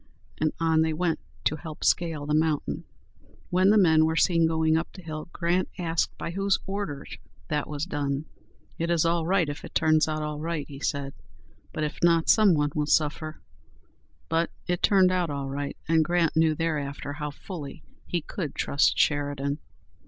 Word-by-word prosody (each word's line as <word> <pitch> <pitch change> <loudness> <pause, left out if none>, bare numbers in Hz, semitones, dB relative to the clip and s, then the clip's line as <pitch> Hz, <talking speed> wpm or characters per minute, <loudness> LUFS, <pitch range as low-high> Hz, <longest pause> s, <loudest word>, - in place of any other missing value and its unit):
and 155 -1 +2
on 160 -1 +3
they 160 0 +1
went, 165 +1 0 0.2
to 155 - +1
help 155 0 -8
scale 165 -4 +1
the 150 - -1
mountain. 155 -1 0 0.7
When 185 +2 +4
the 215 - +5
men 160 -5 +5
were 160 0 +1
seen 165 -1 +4
going 160 -1 +2
up 165 +1 -1
the 185 - -12
hill, 155 0 -6
Grant 175 +2 0
asked 165 -2 -1
by - - -4
whose 195 +2 +1
orders 195 -7 -5 0.3
that 150 -2 -1
was 150 +1 -3
done? 145 -3 -2 0.5
"It 165 +1 -1
is 170 -2 +2
all 165 -1 +1
right 185 -3 +3
if 145 0 -6
it - - -10
turns 155 -1 +4
out 155 -1 -2
all 150 -1 -4
right," 160 -2 -3
he 140 -2 -9
said; 140 -2 -2 0.6
"but 155 - -3
if 150 +1 -3
not, 165 -1 +3
some 210 -5 +6
one 145 -1 +1
will 150 -1 -1
suffer." 155 +1 0 0.9
But 165 +1 +1 0.2
it 175 0 -1
turned 190 -2 +5
out 180 -2 0
all 140 -1 -3
right, 140 +1 -4
and 160 0 +4
Grant 170 0 +1
knew 160 -1 +3
thereafter 145 -3 -2
how 150 0 -4
fully 145 -1 -8 0.2
he 175 - -1
could 155 -2 -5
trust 140 - +2
Sheridan. 145 -1 0
160 Hz, 180 wpm, -27 LUFS, 150-170 Hz, 0.9 s, some